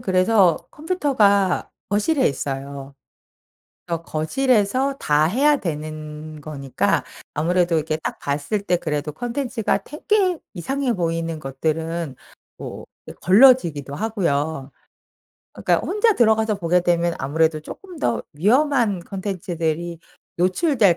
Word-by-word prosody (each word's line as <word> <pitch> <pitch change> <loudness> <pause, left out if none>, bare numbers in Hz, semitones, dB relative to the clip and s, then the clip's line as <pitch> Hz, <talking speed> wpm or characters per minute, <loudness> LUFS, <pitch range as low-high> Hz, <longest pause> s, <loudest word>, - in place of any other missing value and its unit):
그래서 185 -3 +3
컴퓨터가 240 - +1 0.2
거실에 260 +8 +2
있어요. 140 0 -5 0.9
어 165 -1 -2
거실에서 250 - +1
다 150 +1 +3
해야 280 - +3
되는 155 -1 -6
거니까 140 -3 -1 0.3
아무래도 175 +2 +2
이렇게 155 0 0
딱 - - -5
봤을 145 +9 -2
때 180 - +1
그래도 150 -2 -3
콘텐츠가 245 - -1
되게 365 +3 0 0.2
이상해 265 +8 -1
보이는 165 -2 -2
것들은 155 +1 -3 0.4
뭐 - - -7 0.4
걸러지기도 185 - +5
하고요. 160 - -1 0.8
그러니까 - - 0
혼자 425 +2 +3
들어가서 220 - +3
보게 180 -1 +1
되면 170 -1 +1
아무래도 155 +3 +1
쪼끔 360 - -10
더 - - 0 0.2
위험한 240 - +3
컨텐츠들이 170 -3 -3 0.4
노출될 190 - +3
175 Hz, 275 characters per minute, -22 LUFS, 155-230 Hz, 0.9 s, 걸러지기도